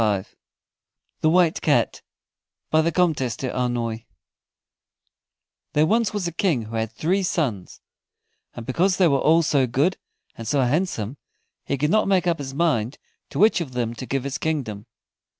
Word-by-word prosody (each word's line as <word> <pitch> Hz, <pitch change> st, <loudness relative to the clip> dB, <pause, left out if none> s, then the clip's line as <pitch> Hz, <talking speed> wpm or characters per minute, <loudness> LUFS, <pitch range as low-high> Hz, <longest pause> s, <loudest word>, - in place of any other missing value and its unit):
THE 155 Hz, -, +4 dB
WHITE 175 Hz, -1 st, +3 dB
CAT -, -, +1 dB, 0.7 s
BY 155 Hz, -, +5 dB
THE 165 Hz, +1 st, +1 dB
COMTESSE 155 Hz, -, +1 dB
D'AULNOY 120 Hz, -3 st, -2 dB, 1.7 s
There 150 Hz, +1 st, +4 dB
was 225 Hz, +5 st, +2 dB
once 205 Hz, -3 st, -3 dB
a 170 Hz, -, -2 dB
King 165 Hz, -, 0 dB
who 110 Hz, +1 st, -8 dB
had 110 Hz, 0 st, -1 dB
three 175 Hz, +11 st, 0 dB
sons, 140 Hz, -, -2 dB, 0.7 s
and 115 Hz, -, -7 dB
because 180 Hz, +9 st, +1 dB
they 185 Hz, -, +5 dB
were 140 Hz, -3 st, +2 dB
all 165 Hz, +2 st, +4 dB
so 140 Hz, -4 st, +2 dB
good 145 Hz, +10 st, +1 dB, 0.4 s
and 115 Hz, -, -8 dB
so 145 Hz, -2 st, +2 dB
handsome, 130 Hz, -, -1 dB, 0.5 s
he 140 Hz, -, 0 dB
could 150 Hz, +4 st, 0 dB
not 215 Hz, 0 st, +3 dB
make 190 Hz, -2 st, +2 dB
up 170 Hz, -3 st, +1 dB
his 135 Hz, -1 st, -6 dB
mind 140 Hz, -7 st, 0 dB, 0.3 s
to -, -, -7 dB
which 210 Hz, -3 st, +4 dB
of 140 Hz, -6 st, -5 dB
them 120 Hz, -2 st, -1 dB
to 130 Hz, +2 st, -8 dB
give 135 Hz, -1 st, -1 dB
his 135 Hz, -1 st, -4 dB
kingdom. 120 Hz, -9 st, -3 dB
145 Hz, 160 wpm, -23 LUFS, 120-170 Hz, 1.7 s, BY